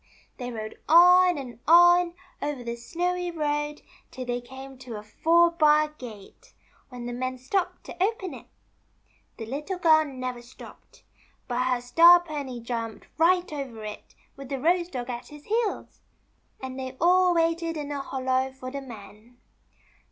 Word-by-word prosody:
They 245 Hz, -2 st, -5 dB
rode 215 Hz, -2 st, -7 dB
on 360 Hz, +1 st, +7 dB
and 250 Hz, -4 st, -8 dB
on, 350 Hz, +1 st, +6 dB, 0.3 s
over 285 Hz, -4 st, -3 dB
the 235 Hz, 0 st, -4 dB
snowy 355 Hz, +9 st, -2 dB
road, 295 Hz, -2 st, -2 dB, 0.3 s
till 255 Hz, -1 st, -7 dB
they 245 Hz, 0 st, -2 dB
came 265 Hz, +1 st, -11 dB
to 250 Hz, -3 st, -8 dB
a 210 Hz, -, -7 dB
four 335 Hz, +10 st, +3 dB
bar 305 Hz, -2 st, +4 dB
gate, 235 Hz, -9 st, -13 dB, 0.3 s
when 245 Hz, -2 st, -8 dB
the 240 Hz, -, -4 dB
men 255 Hz, +1 st, -3 dB
stopped 345 Hz, +9 st, -2 dB
to 365 Hz, -, -3 dB
open 390 Hz, -3 st, -2 dB
it. -, -, -12 dB, 0.9 s
The 225 Hz, -, -6 dB
Little 295 Hz, -, -4 dB
Girl 315 Hz, -3 st, +5 dB
never 255 Hz, -3 st, -6 dB
stopped, 240 Hz, +1 st, -15 dB, 0.4 s
but 250 Hz, 0 st, -1 dB
her 250 Hz, -1 st, 0 dB
Star 335 Hz, +8 st, +7 dB
pony 290 Hz, -7 st, -6 dB
jumped 230 Hz, -1 st, -5 dB
right 355 Hz, 0 st, +3 dB
over 260 Hz, -7 st, -6 dB
it 210 Hz, 0 st, -9 dB, 0.2 s
with 275 Hz, -1 st, -10 dB
the 275 Hz, -2 st, -3 dB
Rose 345 Hz, +4 st, +2 dB
dog 250 Hz, -5 st, -5 dB
at 240 Hz, 0 st, -7 dB
his 295 Hz, -1 st, -13 dB
heels, 445 Hz, 0 st, -2 dB, 0.6 s
and 260 Hz, 0 st, -7 dB
they 260 Hz, 0 st, -6 dB
all 360 Hz, +1 st, +4 dB
waited 330 Hz, 0 st, 0 dB
in 295 Hz, -1 st, -5 dB
a 285 Hz, -1 st, -3 dB
hollow 260 Hz, -1 st, -1 dB
for 255 Hz, -1 st, -8 dB
the 280 Hz, 0 st, -5 dB
men. 230 Hz, -1 st, -13 dB
275 Hz, 160 wpm, -26 LUFS, 245-335 Hz, 0.9 s, on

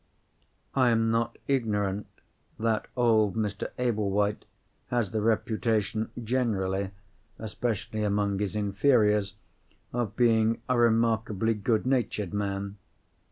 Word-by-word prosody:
I 130 Hz, -2 st, +4 dB
am 115 Hz, -1 st, +2 dB
not 115 Hz, +1 st, 0 dB
ignorant 105 Hz, -6 st, 0 dB, 0.5 s
that 110 Hz, -1 st, 0 dB
old 110 Hz, -4 st, +3 dB
Mr. 105 Hz, -3 st, -2 dB
Ablewhite 105 Hz, -4 st, 0 dB, 0.4 s
has 120 Hz, -6 st, 0 dB
the 110 Hz, -, -1 dB
reputation 110 Hz, -1 st, 0 dB
generally 100 Hz, -6 st, 0 dB, 0.5 s
(especially 110 Hz, 0 st, -3 dB
among 100 Hz, -1 st, 0 dB
his 105 Hz, -1 st, -2 dB
inferiors) 105 Hz, -1 st, +2 dB, 0.6 s
of 115 Hz, -3 st, -2 dB
being 115 Hz, -1 st, +3 dB
a 125 Hz, -, +2 dB
remarkably 115 Hz, -2 st, +2 dB
good 110 Hz, +2 st, 0 dB
natured 115 Hz, -7 st, 0 dB
man. 100 Hz, 0 st, -3 dB
110 Hz, 105 wpm, -28 LUFS, 100-115 Hz, 0.6 s, I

